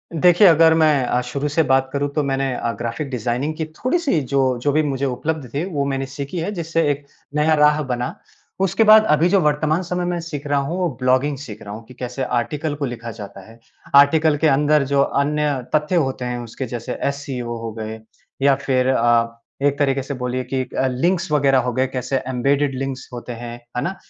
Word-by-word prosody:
देखिए 175 Hz, +4 st, +6 dB
अगर 165 Hz, 0 st, +6 dB
मैं 155 Hz, -4 st, +3 dB
अ, 125 Hz, -, +1 dB
शुरू 140 Hz, +4 st, -3 dB
से 160 Hz, +3 st, +2 dB
बात 135 Hz, -1 st, +2 dB
करूँ 140 Hz, 0 st, 0 dB
तो 150 Hz, -, +1 dB
मैंने 135 Hz, -1 st, -1 dB
अ, 115 Hz, -, -2 dB
ग़्राफ़िक 120 Hz, +5 st, -4 dB
डिज़ाइनिंग 125 Hz, +4 st, -2 dB
की 160 Hz, -, -2 dB
थोड़ी-सी 255 Hz, -, 0 dB
जो, 130 Hz, -1 st, +1 dB
जो 145 Hz, +3 st, +1 dB
भी 155 Hz, +2 st, +2 dB
मुझे 140 Hz, -1 st, -1 dB
उपलब्ध 140 Hz, +2 st, -3 dB
थे 145 Hz, +3 st, -1 dB
वो 140 Hz, -1 st, 0 dB
मैंने 135 Hz, -1 st, -2 dB
सीखी 140 Hz, +5 st, -6 dB
है 170 Hz, +5 st, -2 dB
जिससे 165 Hz, -3 st, -1 dB
एक 140 Hz, 0 st, -5 dB, 0.3 s
नया 150 Hz, +1 st, +3 dB
राह 150 Hz, 0 st, +4 dB
बना। 125 Hz, 0 st, -2 dB, 0.5 s
उसके 195 Hz, +4 st, +2 dB
बाद 215 Hz, 0 st, +7 dB
अभी 155 Hz, +3 st, +4 dB
जो 195 Hz, +1 st, +4 dB
वर्तमान 155 Hz, +2 st, +1 dB
समय 180 Hz, 0 st, -2 dB
मैं 175 Hz, -1 st, -1 dB
सीख 145 Hz, -3 st, -6 dB
रहा 140 Hz, 0 st, +2 dB
हूँ, 150 Hz, +6 st, -3 dB
वो 180 Hz, -2 st, 0 dB
ब्लॉगिंग 130 Hz, +3 st, +2 dB
सीख 115 Hz, -6 st, -9 dB
रहा 100 Hz, 0 st, -8 dB
हूँ 115 Hz, +2 st, -8 dB
कि 125 Hz, -, -13 dB
कैसे 125 Hz, +1 st, -4 dB
आर्टिकल 145 Hz, +5 st, -2 dB
को 145 Hz, -1 st, -3 dB
लिखा 120 Hz, -2 st, -6 dB
जाता 100 Hz, -3 st, -9 dB
है। 115 Hz, +1 st, -16 dB, 0.4 s
आर्टिकल 150 Hz, +2 st, +5 dB
के 160 Hz, -, +2 dB
अंदर 150 Hz, +1 st, +3 dB
जो 140 Hz, 0 st, +2 dB
अन्य 150 Hz, +2 st, +1 dB, 0.2 s
तथ्य 155 Hz, +4 st, +1 dB
होते 135 Hz, -5 st, 0 dB
हैं, 125 Hz, 0 st, -3 dB
उसके 120 Hz, +3 st, -6 dB
जैसे 120 Hz, +1 st, -5 dB
एससीओ 130 Hz, -4 st, -4 dB
हो 115 Hz, -1 st, -4 dB
गए, 110 Hz, 0 st, -6 dB, 0.4 s
या 140 Hz, 0 st, +5 dB
फिर 130 Hz, -1 st, +2 dB
अ, 115 Hz, -2 st, +2 dB, 0.3 s
एक 140 Hz, 0 st, +2 dB
तरीके 135 Hz, -1 st, +1 dB
से 140 Hz, -, -5 dB
बोलिए 125 Hz, 0 st, -3 dB
कि 130 Hz, -1 st, 0 dB, 0.2 s
लिंक्स 170 Hz, +6 st, 0 dB
वगैरह 135 Hz, -2 st, +3 dB
हो 125 Hz, 0 st, -1 dB
गए, 130 Hz, +1 st, +1 dB
कैसे 130 Hz, +1 st, -2 dB
एम्बेडेड 135 Hz, +2 st, +1 dB
लिंक्स 135 Hz, -1 st, -4 dB
होते 120 Hz, 0 st, -7 dB
हैं, 115 Hz, 0 st, -7 dB, 0.2 s
है 125 Hz, -, +1 dB
ना? 190 Hz, +2 st, -2 dB
140 Hz, 210 wpm, -21 LUFS, 125-155 Hz, 0.5 s, बाद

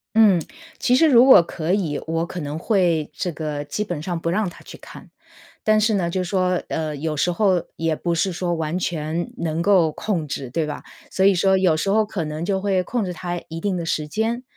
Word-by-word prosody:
嗯， 210 Hz, -5 st, +6 dB, 0.4 s
其 250 Hz, -, +2 dB
实 320 Hz, +5 st, +5 dB
如 250 Hz, -3 st, +7 dB
果 260 Hz, -9 st, +9 dB
可 165 Hz, +1 st, -3 dB
以， 165 Hz, -8 st, -1 dB
我 165 Hz, +1 st, -1 dB
可 180 Hz, -, -6 dB
能 150 Hz, +1 st, -4 dB
会 175 Hz, -6 st, +1 dB
这 180 Hz, -, -3 dB
个 150 Hz, -2 st, -4 dB
基 210 Hz, -, -3 dB
本 175 Hz, -7 st, -5 dB
上 175 Hz, -2 st, -3 dB
不 165 Hz, -, -2 dB
让 205 Hz, +4 st, 0 dB
他 175 Hz, -, -10 dB
去 -, -, -11 dB
看， -, -, -13 dB, 0.5 s
但 215 Hz, 0 st, +3 dB
是 220 Hz, +1 st, +2 dB
呢， 180 Hz, -4 st, 0 dB
就 185 Hz, +2 st, -2 dB
说， 180 Hz, 0 st, 0 dB
呃， 155 Hz, -2 st, -3 dB
有 155 Hz, +2 st, -3 dB
时 160 Hz, +4 st, +1 dB
候 185 Hz, -1 st, +2 dB
也 165 Hz, -1 st, 0 dB
不 170 Hz, +2 st, -2 dB
是 185 Hz, +3 st, 0 dB
说 175 Hz, 0 st, -2 dB
完 160 Hz, +2 st, -2 dB
全 165 Hz, -1 st, -3 dB
能 165 Hz, -1 st, -2 dB
够 175 Hz, -4 st, +3 dB
控 170 Hz, -3 st, -2 dB
制， 140 Hz, -2 st, -5 dB
对 160 Hz, +6 st, -1 dB
吧？ 150 Hz, -1 st, -5 dB, 0.3 s
所 190 Hz, -, +2 dB
以 200 Hz, -, +5 dB
说 190 Hz, +1 st, +3 dB
有 180 Hz, -4 st, +3 dB
时 195 Hz, +5 st, -1 dB
候 215 Hz, +1 st, +3 dB
可 190 Hz, -5 st, -3 dB
能 155 Hz, +1 st, -5 dB
就 190 Hz, +2 st, 0 dB
会 190 Hz, -1 st, +1 dB
控 230 Hz, +3 st, -2 dB
制 180 Hz, -, -3 dB
他 175 Hz, 0 st, -4 dB
一 165 Hz, +1 st, -6 dB
定 195 Hz, 0 st, -1 dB
的 170 Hz, -, -3 dB
时 155 Hz, -2 st, -2 dB
间， 225 Hz, +7 st, -1 dB
175 Hz, 245 characters per minute, -22 LUFS, 160-195 Hz, 0.5 s, 果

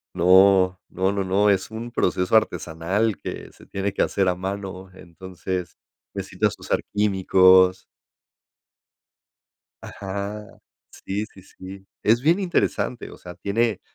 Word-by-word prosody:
No, 95 Hz, +1 st, +5 dB
no, 95 Hz, +1 st, 0 dB
no, 100 Hz, -1 st, -1 dB
no. 100 Hz, +2 st, +2 dB
Es 95 Hz, +1 st, 0 dB
un 115 Hz, +2 st, -6 dB
proceso 90 Hz, -3 st, 0 dB
artesanal 100 Hz, +1 st, 0 dB
que -, -, -7 dB
se -, -, -18 dB
tiene 95 Hz, 0 st, -3 dB
que -, -, -1 dB
hacer 95 Hz, -2 st, +1 dB
a 90 Hz, -, +1 dB
mano. 95 Hz, 0 st, -6 dB
Entonces, 90 Hz, 0 st, -7 dB, 0.4 s
necesitas -, -, -2 dB
usar -, -, -1 dB
químicos. 95 Hz, -2 st, +4 dB, 2.0 s
Ajá. 100 Hz, +2 st, -6 dB, 0.4 s
Sí, 100 Hz, +2 st, -4 dB
sí, 100 Hz, -, -17 dB
sí, 95 Hz, +1 st, -12 dB, 0.2 s
es 115 Hz, +3 st, +3 dB
bien 165 Hz, +7 st, +3 dB
interesante, 175 Hz, -, -1 dB
o -, -, -12 dB
sea, 90 Hz, -, -10 dB
tiene, 105 Hz, +3 st, -1 dB
95 Hz, 125 wpm, -23 LUFS, 95-105 Hz, 2.0 s, No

